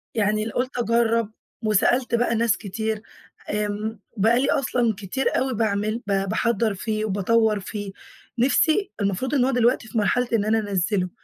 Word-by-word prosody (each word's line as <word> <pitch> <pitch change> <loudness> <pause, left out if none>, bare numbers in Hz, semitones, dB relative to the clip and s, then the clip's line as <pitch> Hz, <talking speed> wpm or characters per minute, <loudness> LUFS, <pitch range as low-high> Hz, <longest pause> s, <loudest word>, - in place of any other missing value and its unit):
يعني 215 0 +1
الل 225 - -4
قُلت 250 +1 -2
أجَرّب، 230 -2 +1 0.3
وسألت 235 +4 +2
بقى 235 -1 +1
ناس 230 -3 +2
كتير، 220 +1 -3 0.5
آمم 210 +1 -2 0.2
بقى 225 +5 +3
لي 270 - +1
أصلًا 245 -4 +1
كتير 210 +7 -1
أوي 260 -1 0
باعمل، 215 +1 -1
ب - - -1 0.2
باحَضّر 225 -1 +1
فيه 215 +2 -2
وباطوّر 215 +2 +2
فيه، 205 0 -6 0.5
نِفْسي 315 - +3
المفروض 200 +8 -1
إن 250 - +3
هو 270 - +1
دلوقتي 240 -1 +2
في 230 - -5
مرحلة 235 +4 +2
إن 210 -2 +2
أنا 220 +1 +2
أنَزِّله، 195 -2 -1
220 Hz, 160 wpm, -23 LUFS, 205-240 Hz, 0.5 s, بقى